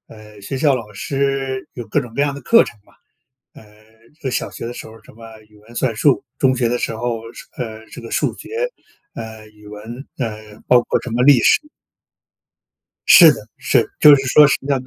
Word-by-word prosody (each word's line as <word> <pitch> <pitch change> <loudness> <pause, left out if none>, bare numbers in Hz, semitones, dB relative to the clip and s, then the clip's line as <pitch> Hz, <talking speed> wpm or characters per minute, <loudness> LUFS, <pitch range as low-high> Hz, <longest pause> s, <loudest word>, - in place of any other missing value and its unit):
呃， 105 -1 -15
学 130 +7 -5
校 140 -1 +2
老 115 -4 -7
师 135 +2 -3
有 120 -3 -8
各 140 +7 0
种 120 -3 -11
各 140 - 0
样 145 -1 0
的 140 - -9
课 230 0 +5
程 - - -11
嘛， - - -25 0.6
呃， 110 +6 -12
小 - - -2
学 - - -8
的 120 - -6
时 - - -9
候 110 - -13
什 - - -17
么 115 0 -14
语 105 - -22
文 115 +3 -18
算 120 -2 -1
术， 140 +3 +2 0.2
中 130 -1 +2
学 120 -2 0
的 120 +1 -1
时 115 - -3
候， 120 0 -3 0.4
呃， 110 -3 -7
这 - - -10
个 - - -10
数 - - 0
学， - - -12 0.6
呃， 110 -1 -9
语 105 -1 -18
文， 110 +6 -10
呃， 110 -4 -6
包 125 -1 +5
括 - - -1
什 120 - -7
么 120 +2 0
历 135 -1 +6
史。 - - +4 1.5
是 165 -4 +9
的， 105 - -10
是， - - +1
就 150 -1 +9
是 135 -1 -1
说 150 +2 +7
什 140 - +2
么 140 - -6
样 135 -2 0
的 - - -17
120 Hz, 225 characters per minute, -18 LUFS, 110-135 Hz, 1.5 s, 是